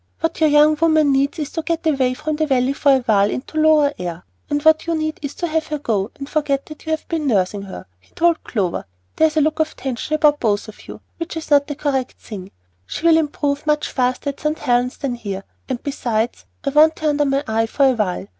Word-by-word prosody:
"What 325 0 -2
your 310 - +5
young 300 +1 +5
woman 315 -3 +4
needs 275 +3 +1
is 300 -2 -4
to 325 - -3
get 330 0 -3
away 265 -5 +2
from 305 +4 -3
the 310 0 0
Valley 260 -1 +2
for 280 0 +3
a - - +2
while 210 -4 +3
into 300 +7 -4
lower 305 -2 +4
air; 175 -1 -5 0.3
and 290 -1 +1
what 315 +1 +4
you 335 - +1
need 310 0 -2
is 285 -1 -5
to 350 - -3
have 320 -1 -1
her 300 - -2
go, 215 -7 -1
and 275 - -7
forget 285 -2 -1
that 305 0 -12
you - - -3
have 315 0 -2
been 320 -3 -2
nursing 200 -3 +1
her," 190 - -9
he 90 - -30
told 335 -1 +2
Clover. 190 -7 -2 0.3
"There 320 - +5
is 310 0 -5
a - - +5
look 310 +2 0
of 315 0 0
tension 265 +3 -3
about 300 -1 +5
you 225 - +2
both 210 +1 -11 0.2
which 335 0 -5
is 320 -1 -7
not 285 -1 +5
the 290 - -4
correct 270 -3 -1
thing. 195 -4 -9 0.4
She'll 330 - +3
improve 290 -2 -1
much 300 0 +1
faster 255 +2 0
at 280 - -20
St. 305 0 -1
Helen's 245 -1 0
than 275 -3 -2
here, 200 -5 -5 0.3
and 255 -2 -3
besides, 240 -5 -2 0.2
I 275 - -1
want 310 +2 +5
her 310 - 0
under 295 0 +1
my 275 0 +1
eye 225 +1 +1
for 275 +5 +2
a 265 - +5
while. 210 -6 -2
285 Hz, 240 wpm, -20 LUFS, 245-310 Hz, 0.4 s, your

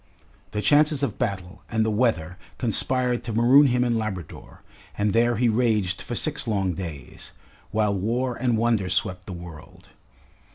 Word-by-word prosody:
The 105 0 -3
chances 145 +5 +3
of 140 - -2
battle 95 -6 -3
and 110 -1 +1
the 110 - 0
weather 100 -7 0 0.2
conspired 125 +1 0
to 115 - -5
maroon 125 +6 +6
him 125 -1 +2
in 120 -2 +1
Labrador, 95 -7 -7 0.3
and 105 -1 +1
there 120 +1 +3
he 120 +2 +2
raged 105 -5 +1
for 120 - -5
six 150 0 -2
long 95 -4 0
days, 80 -7 -8 0.4
while 105 -1 +1
war 120 +6 -1
and 120 -2 0
wonder 110 -4 +1
swept 90 -1 -1
the - - -6
world. 85 -3 -12
110 Hz, 160 wpm, -24 LUFS, 95-120 Hz, 0.4 s, maroon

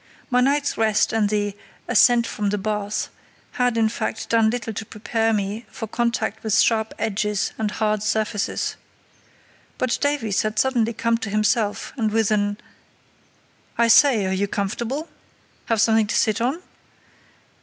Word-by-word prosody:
My 250 0 +4
night's 285 +1 +1
rest 220 -1 +2
and 215 -2 +2
the 205 -1 -1 0.3
"ascent 240 -1 +5
from 205 -2 -2
the 210 - -1
bath" 210 0 -2 0.4
had, 245 -2 0
in 225 -1 +3
fact, 220 0 -4
done 225 -1 +4
little 225 -1 -3
to 220 - -4
prepare 225 +1 -1
me 210 +2 -2
for 225 - -6
contact 230 -1 -2
with 220 0 +2
sharp 220 -1 +2
edges 210 -1 -1
and 215 -1 0
hard 215 0 -1
surfaces. 215 0 -1 1.0
But 255 -2 0
Davies 280 -9 0
had 215 0 -3
suddenly 235 -2 +1
come 230 +1 0
to 225 - -4
himself, 215 +1 0
and 220 -3 +1
with 220 -1 +1
an 205 -1 +1 1.2
"I 235 0 +3
say, 235 -4 +6
are 190 - -1
you 200 +2 0
comfortable? 235 +10 -3 0.6
Have 225 -2 0
something 220 -1 +3
to 210 - -2
sit 215 +1 +1
on?" 275 +9 -1
220 Hz, 155 wpm, -22 LUFS, 210-235 Hz, 1.2 s, say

